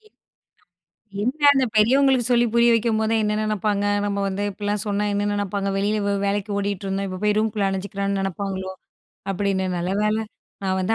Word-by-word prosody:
என்ன, 430 -1 -27 1.0
என்ன 285 +6 +3
அந்த 265 -1 +3
பெரியவங்களுக்கு 260 +2 +4
சொல்லி 240 0 +4
புரிய 235 0 +5
வைக்கும்போதுதான், 220 -1 +1
என்ன 210 0 0
நினைப்பாங்க. 210 -1 0 0.2
நம்ம 200 0 -2
வந்து 195 +1 -3
இப்படிலாம் 205 +1 -2
சொன்னா, 205 0 0
என்ன 205 0 0
நினைப்பாங்க 200 0 -2
வெளியில 210 +2 0
வே 200 - +1
வேலைக்கு 205 +1 -1
ஓடிட்ருந்தோம். 195 -1 -2
இப்ப 185 0 -5
போய் 210 0 +2
ரூம்குள்ளே 215 -2 0
அடைஞ்சுக்கிறான்னு 195 0 -2
நினைப்பாங்களோ, 190 0 -3 0.6
அப்படின்னு. 190 -1 0
நல்ல 175 +2 -2
வேலை 215 +1 +1 0.4
நான் 190 0 0
வந்து 210 +5 +1
205 Hz, 160 wpm, -23 LUFS, 195-220 Hz, 1.0 s, புரிய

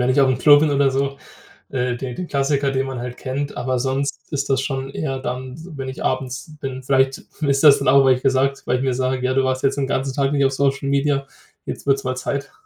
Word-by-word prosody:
wenn 125 - +1
ich 130 +2 +3
aufm 130 -2 +3
Klo 145 -1 +7
bin 155 -1 +2
oder 140 -1 +3
so, 140 +1 -1 0.5
äh, 125 -2 -1
den 125 0 -5
den 180 +6 -5
Klassiker, 140 0 +1
den 135 0 -1
man 130 -2 -5
halt 125 0 -6
kennt. 140 +2 -4
Aber 130 0 -1
sonst 135 +4 -3
ist 140 0 -2
das 135 -1 +2
schon 135 -1 -3
eher 135 -2 -3
dann, 130 0 -5 0.2
wenn 135 -1 -5
ich 130 - -6
abends 130 +4 -3
bin. 130 -2 -5
Vielleicht 135 0 +2 0.2
ist 140 -1 +1
das 145 -2 +8
dann - - -1
auch, 135 +1 +6
weil 130 - +6
ich 125 - -6
gesagt 135 0 +1
weil 125 - +2
ich 125 - -3
mir 130 -2 +1
sage: 130 0 -1
„Ja, 130 - 0
du 135 - +3
warst 130 0 -1
jetzt 135 +1 +1
den 135 - -1
ganzen 135 0 -1
Tag 135 0 +1
nicht 140 -1 +2
auf 135 - +2
Social 135 0 0
Media. 140 0 +1 0.4
Jetzt - - -6
wird's 135 -1 +2
mal 130 - -1
Zeit.“ 140 +2 -4
135 Hz, 250 wpm, -21 LUFS, 130-140 Hz, 0.5 s, das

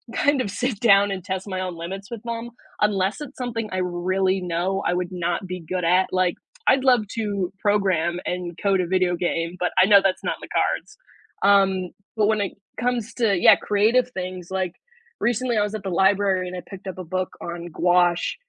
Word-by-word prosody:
kind 285 -2 +2
of 205 - -3
sit 245 +2 -2
down, 200 -3 +5
and 185 -3 -4
test 190 +1 -4
my 185 -1 -3
own 180 -2 -4
limits 195 +5 -7
with 230 -3 -6
them, 235 0 -4 0.3
unless 205 +4 +1
it's 285 -2 -8
something 230 -4 -3
I 185 - -2
really 185 +1 0
know 180 +3 -1
I - - +2
would 180 0 -2
not 175 +1 -2
be 180 0 -5
good 180 +1 -2
at, 185 +2 +4
like, 185 -1 +2 0.3
I'd 260 0 +4
love 245 -5 +4
to 200 -5 -2
program, 185 -5 +1
and 180 -1 -4
code 195 -2 +2
a 175 - -2
video 185 -1 +2
game, 170 0 -2
but 180 - +1
I - - +7
know 200 -2 +7
that's 190 -1 0
not - - -1
in - - -10
the - - -34
cards, - - -1 0.5
um, 195 -2 +3 0.3
but 210 - +3
when 215 -1 +2
it 200 - -2 0.3
comes 245 -3 -1
to 205 -5 +3
yeah, - - +8
creative 225 +5 +2
things, 185 -3 -6
like, 185 -2 -1 0.5
recently 240 0 +1
I - - +3
was 210 +1 -3
at 215 - -6
the 195 - -3
library 190 0 +2
and 180 - -6
I - - -5
picked 195 0 -10
up 185 - -5
a 185 - -6
book 185 +2 -2
on 170 0 -6
gouache, 175 +1 +2
190 Hz, 210 wpm, -23 LUFS, 180-210 Hz, 0.5 s, yeah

